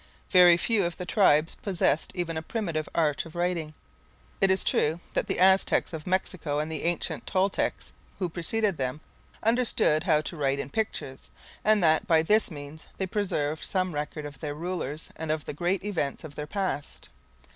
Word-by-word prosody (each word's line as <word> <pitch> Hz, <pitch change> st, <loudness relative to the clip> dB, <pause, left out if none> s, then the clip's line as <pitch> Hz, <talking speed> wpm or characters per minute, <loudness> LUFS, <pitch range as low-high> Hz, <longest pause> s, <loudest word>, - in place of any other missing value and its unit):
Very 180 Hz, -2 st, +8 dB
few 215 Hz, +2 st, +2 dB
of 170 Hz, -1 st, -2 dB
the 180 Hz, -, -4 dB
tribes 165 Hz, -5 st, +3 dB
possessed 180 Hz, -5 st, 0 dB
even 175 Hz, -2 st, -2 dB
a 160 Hz, -, -2 dB
primitive 165 Hz, -4 st, -3 dB
art 150 Hz, -4 st, +1 dB
of 165 Hz, 0 st, -13 dB
writing. 170 Hz, -3 st, -1 dB, 0.7 s
It 195 Hz, -, +5 dB
is 190 Hz, 0 st, +4 dB
true 160 Hz, +3 st, +1 dB
that -, -, 0 dB
the -, -, -2 dB
Aztecs 190 Hz, -1 st, +4 dB
of 160 Hz, +1 st, -6 dB
Mexico, 180 Hz, -5 st, -1 dB
and 155 Hz, +2 st, -2 dB
the 155 Hz, -1 st, -4 dB
ancient 175 Hz, 0 st, -1 dB
Toltecs 195 Hz, +1 st, 0 dB, 0.3 s
who 185 Hz, -, -1 dB
preceded 185 Hz, +3 st, -1 dB
them, 130 Hz, +3 st, -3 dB, 0.4 s
understood 225 Hz, -9 st, +2 dB
how 155 Hz, -4 st, +3 dB
to 155 Hz, -, -6 dB
write 140 Hz, -3 st, 0 dB
in 140 Hz, -, -5 dB
pictures, 140 Hz, -10 st, -3 dB, 0.3 s
and 215 Hz, -3 st, +4 dB
that, 160 Hz, -1 st, +3 dB
by 160 Hz, -1 st, +4 dB
this 215 Hz, +6 st, +3 dB
means, 145 Hz, -1 st, -8 dB
they 190 Hz, -, -1 dB
preserved 160 Hz, -7 st, -1 dB
some 185 Hz, -2 st, 0 dB
record 150 Hz, +1 st, -4 dB
of 145 Hz, -2 st, -9 dB
their 145 Hz, -1 st, -4 dB
rulers 160 Hz, -3 st, -4 dB
and 160 Hz, -1 st, -5 dB
of 155 Hz, -1 st, -1 dB
the -, -, -5 dB
great 175 Hz, +6 st, -1 dB
events 175 Hz, -9 st, -2 dB
of 155 Hz, -2 st, -9 dB
their 150 Hz, +1 st, -6 dB
past. 190 Hz, -6 st, -4 dB
165 Hz, 180 wpm, -27 LUFS, 150-190 Hz, 0.7 s, Very